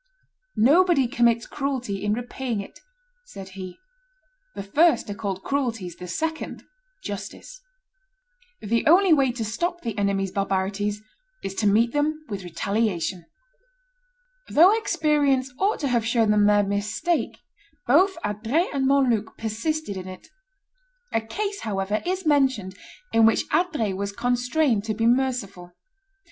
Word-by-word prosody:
"Nobody 295 Hz, +3 st, +4 dB
commits 235 Hz, -1 st, +2 dB
cruelty 250 Hz, -8 st, -3 dB
in 210 Hz, 0 st, +1 dB
repaying 245 Hz, 0 st, -3 dB
it," 200 Hz, -, -9 dB, 0.4 s
said 195 Hz, -, -10 dB
he; 185 Hz, -1 st, -9 dB, 0.8 s
"the -, -, -5 dB
first 310 Hz, -, +3 dB
are -, -, -2 dB
called 200 Hz, -3 st, -4 dB
cruelties, 230 Hz, -11 st, -2 dB
the 180 Hz, -, -8 dB
second 320 Hz, -, -4 dB, 0.4 s
justice. -, -, -7 dB, 1.0 s
The 230 Hz, +8 st, 0 dB
only 360 Hz, +2 st, +6 dB
way 270 Hz, -4 st, +3 dB
to 235 Hz, -2 st, -4 dB
stop 345 Hz, -, -2 dB
the 230 Hz, -8 st, -4 dB
enemy's 195 Hz, -1 st, 0 dB
barbarities 200 Hz, +2 st, -1 dB, 0.4 s
is 195 Hz, -, -4 dB
to 210 Hz, +2 st, 0 dB
meet 225 Hz, +4 st, +3 dB
them 305 Hz, +1 st, -1 dB
with 200 Hz, -3 st, -5 dB
retaliation." 180 Hz, 0 st, -2 dB, 1.2 s
Though 360 Hz, +7 st, +6 dB
experience 295 Hz, -, +1 dB
ought 410 Hz, +3 st, +2 dB
to 285 Hz, -, 0 dB
have 235 Hz, -2 st, +1 dB
shown 225 Hz, -1 st, +2 dB
them 210 Hz, -1 st, +4 dB
their 205 Hz, 0 st, +4 dB
mistake, 205 Hz, -, -1 dB, 0.5 s
both 365 Hz, +10 st, +4 dB
Adrets 225 Hz, -, -1 dB
and 270 Hz, -1 st, +1 dB
Montluc 250 Hz, -6 st, +1 dB
persisted 225 Hz, +2 st, -3 dB
in 185 Hz, 0 st, -7 dB
it. 185 Hz, 0 st, -11 dB, 0.8 s
A 225 Hz, -, +2 dB
case, 400 Hz, -, -4 dB
however, 205 Hz, 0 st, -2 dB
is 370 Hz, 0 st, -2 dB
mentioned 265 Hz, -11 st, +1 dB, 0.4 s
in 225 Hz, 0 st, +6 dB
which 225 Hz, -, +2 dB
Adrets 300 Hz, -, 0 dB
was 200 Hz, +1 st, -4 dB
constrained 245 Hz, 0 st, +1 dB
to 215 Hz, -1 st, -2 dB
be 225 Hz, +1 st, 0 dB
merciful. 235 Hz, -8 st, 0 dB
230 Hz, 135 wpm, -24 LUFS, 200-290 Hz, 1.2 s, only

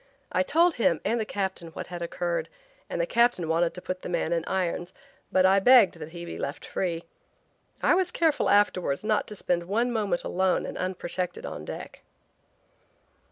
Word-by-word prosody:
I 185 Hz, -, +2 dB
told 335 Hz, -, +3 dB
him 170 Hz, -, +2 dB
and 230 Hz, +1 st, +1 dB
the 220 Hz, -, -1 dB
captain 190 Hz, -4 st, -3 dB
what 165 Hz, -, -7 dB
had 175 Hz, -1 st, -7 dB
occurred 170 Hz, 0 st, -2 dB, 0.4 s
and -, -, -3 dB
the -, -, +2 dB
captain 235 Hz, -, +2 dB
wanted 165 Hz, +1 st, +1 dB
to 180 Hz, -, -8 dB
put 185 Hz, 0 st, -4 dB
the -, -, -6 dB
man 170 Hz, -1 st, 0 dB
in 165 Hz, -1 st, 0 dB
irons 180 Hz, -1 st, -2 dB, 0.4 s
but 185 Hz, 0 st, +4 dB
I 190 Hz, +1 st, +5 dB
begged 205 Hz, -5 st, +6 dB
that 155 Hz, 0 st, -7 dB
he 170 Hz, +1 st, -8 dB
be 170 Hz, -, -7 dB
left 140 Hz, +4 st, -4 dB
free. 170 Hz, -3 st, -2 dB, 0.8 s
I -, -, +5 dB
was 365 Hz, 0 st, +2 dB
careful 325 Hz, -4 st, +1 dB
afterwards 185 Hz, -8 st, +2 dB
not 215 Hz, -1 st, +1 dB
to 210 Hz, -, -7 dB
spend 175 Hz, -3 st, -1 dB
one 230 Hz, +5 st, +1 dB
moment 205 Hz, -6 st, 0 dB
alone 185 Hz, 0 st, +1 dB
and -, -, -6 dB
unprotected 185 Hz, -1 st, -3 dB
on -, -, -6 dB
deck. -, -, -8 dB
185 Hz, 185 wpm, -27 LUFS, 170-215 Hz, 0.8 s, begged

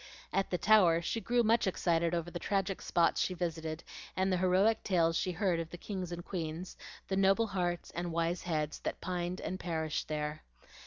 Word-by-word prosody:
At 195 Hz, 0 st, +1 dB
the 180 Hz, -, 0 dB
Tower 185 Hz, -5 st, +5 dB
she 225 Hz, -, -1 dB
grew 240 Hz, +1 st, +2 dB
much 225 Hz, -1 st, +3 dB
excited 170 Hz, -2 st, +1 dB
over 170 Hz, 0 st, -3 dB
the 175 Hz, -, -4 dB
tragic 195 Hz, +1 st, -1 dB
spots 170 Hz, -1 st, +2 dB
she 185 Hz, -, 0 dB
visited 160 Hz, -2 st, -3 dB, 0.3 s
and 190 Hz, 0 st, +2 dB
the -, -, +2 dB
heroic 185 Hz, +5 st, +3 dB
tales 165 Hz, -3 st, +2 dB
she 185 Hz, -, 0 dB
heard 180 Hz, -1 st, +1 dB
of 165 Hz, -1 st, -4 dB
the 175 Hz, -, -8 dB
kings 185 Hz, -1 st, -5 dB
and 175 Hz, 0 st, -6 dB
queens, 170 Hz, 0 st, -4 dB, 0.3 s
the 190 Hz, -, -1 dB
noble 195 Hz, +3 st, +4 dB
hearts 175 Hz, -4 st, -2 dB
and 175 Hz, 0 st, -3 dB
wise 170 Hz, +1 st, 0 dB
heads, 155 Hz, -3 st, -2 dB
that -, -, -4 dB
pined 180 Hz, 0 st, -3 dB
and 185 Hz, -, -4 dB
perished 160 Hz, -3 st, -2 dB
there. 150 Hz, 0 st, -3 dB
175 Hz, 195 wpm, -32 LUFS, 165-190 Hz, 0.3 s, Tower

